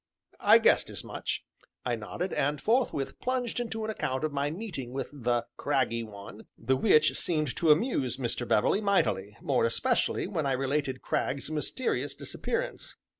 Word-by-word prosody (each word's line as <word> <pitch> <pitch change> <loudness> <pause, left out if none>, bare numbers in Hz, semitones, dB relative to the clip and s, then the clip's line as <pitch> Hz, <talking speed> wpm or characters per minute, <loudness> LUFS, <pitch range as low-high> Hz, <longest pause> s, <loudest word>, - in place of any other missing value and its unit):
"I - - +7
guessed - - +3
as - - -7
much," - - -4 0.4
I 125 - +1
nodded, 165 - -4
and 145 +1 0
forthwith 220 - 0
plunged 250 -2 -1
into 225 -2 -3
an 220 - -1
account 130 -9 -2
of 155 -2 -1
my 140 +1 0
meeting 155 - -5
with 135 -1 -4
the 120 -3 0
"craggy 130 -5 +1
one," 105 -1 -10
the 130 +4 +1
which 155 +3 +4
seemed 155 -6 -1
to 165 - +2
amuse 150 - +3
Mr. 120 -1 -2
Beverley 190 - +3
mightily, 105 - +1
more 135 -4 +2
especially 230 - +1
when 170 -6 -1
I 135 - +2
related 135 0 -1
Cragg's 140 +3 -1
mysterious 155 - -2
disappearance. - - -4
145 Hz, 160 wpm, -29 LUFS, 125-195 Hz, 0.4 s, I